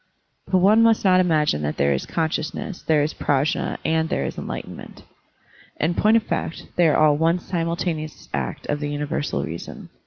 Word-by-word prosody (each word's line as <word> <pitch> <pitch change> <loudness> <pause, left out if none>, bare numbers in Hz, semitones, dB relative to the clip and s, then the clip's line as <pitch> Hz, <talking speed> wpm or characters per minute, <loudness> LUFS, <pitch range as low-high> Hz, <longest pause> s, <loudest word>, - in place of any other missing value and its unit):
But 185 0 +2
one 205 +5 +5
must 225 -2 +3
not 185 -1 +5
imagine 155 - +2
that 75 0 -3
there 70 0 +2
is 70 - -3
con 160 -1 0
sciousness, 160 +5 -4
there 155 -2 +3
is 150 - -2
PrajM, 145 +1 0
and 160 0 +1
there 70 - -1
is - - -4
enlighten - - -6
ment. - - -12 0.8
In 160 +3 +1
point 215 +5 +4
of 225 - 0
fact, 165 - -3
they 175 -2 +4
are 150 - +3
all 155 -1 +5
one 165 +3 +2
simul 170 -1 -2
taneous 155 -4 -4
act 70 -4 -3
of 145 - -2
the 145 -1 -3
universal 145 0 -2
reason. 85 +1 -7
160 Hz, 195 wpm, -22 LUFS, 145-180 Hz, 0.8 s, one